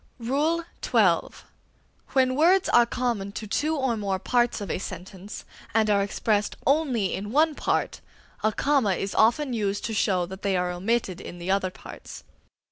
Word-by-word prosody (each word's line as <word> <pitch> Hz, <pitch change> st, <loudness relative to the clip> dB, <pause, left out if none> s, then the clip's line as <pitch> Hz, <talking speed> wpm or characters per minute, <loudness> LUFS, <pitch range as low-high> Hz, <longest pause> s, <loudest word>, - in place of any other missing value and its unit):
XII. 290 Hz, +8 st, 0 dB, 1.5 s
When 255 Hz, -1 st, +3 dB
words 350 Hz, +6 st, +4 dB
are 240 Hz, -1 st, +5 dB
common 235 Hz, -6 st, -2 dB
to 220 Hz, -, -5 dB
two 300 Hz, +9 st, 0 dB
or 265 Hz, -5 st, 0 dB
more 200 Hz, -3 st, -1 dB
parts 240 Hz, +5 st, +1 dB
of 205 Hz, -, -4 dB
a -, -, -2 dB
sentence, 190 Hz, +2 st, -8 dB, 0.3 s
and 220 Hz, -1 st, +3 dB
are 200 Hz, -1 st, +3 dB
expressed 205 Hz, +1 st, 0 dB
only 265 Hz, -9 st, +1 dB
in 205 Hz, +2 st, -4 dB
one 310 Hz, +4 st, +3 dB
part, -, -, -1 dB, 0.4 s
a 215 Hz, -, +3 dB
comma 265 Hz, -4 st, +2 dB
is 195 Hz, +2 st, -3 dB
often 245 Hz, +5 st, +3 dB
used 205 Hz, -3 st, -1 dB
to 225 Hz, -, -3 dB
show 185 Hz, -4 st, +1 dB
that 190 Hz, +2 st, -9 dB
they 195 Hz, -2 st, +1 dB
are 180 Hz, 0 st, 0 dB
omitted 190 Hz, 0 st, -1 dB
in 175 Hz, -, -9 dB
the 175 Hz, +2 st, -3 dB
other 195 Hz, -1 st, +1 dB
parts. -, -, -11 dB
220 Hz, 165 wpm, -26 LUFS, 195-260 Hz, 1.5 s, are